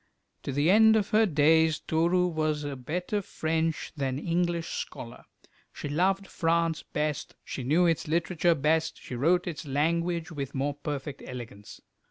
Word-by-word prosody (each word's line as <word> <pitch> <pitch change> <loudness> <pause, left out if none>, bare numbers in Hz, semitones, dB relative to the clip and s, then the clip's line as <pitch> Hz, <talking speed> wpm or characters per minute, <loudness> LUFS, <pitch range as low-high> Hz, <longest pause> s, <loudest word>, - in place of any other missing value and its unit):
To - - -4
the 145 +6 +3
end 220 +2 +6
of 210 -2 +1
her 220 +1 +4
days 160 0 +4
Toru 170 +3 +1
was 155 -3 -1
a 145 -1 -4
better 180 - -3
French 160 -3 -2
than 135 -3 -2
English 170 +1 -1
scholar. 120 +1 -7 0.5
She 145 - -6
loved 190 +6 +1
France 165 -2 0
best, 150 -1 -3
she 130 - -6
knew 155 +8 +3
its 165 -2 +1
literature 170 +1 +2
best, 160 +2 +1
she - - -9
wrote 170 +9 +2
its 165 -3 -5
language 170 +4 0
with 140 -3 -5
more 140 +2 0
perfect 145 -1 -5
elegance. 115 -5 -9
160 Hz, 155 wpm, -28 LUFS, 145-175 Hz, 0.5 s, end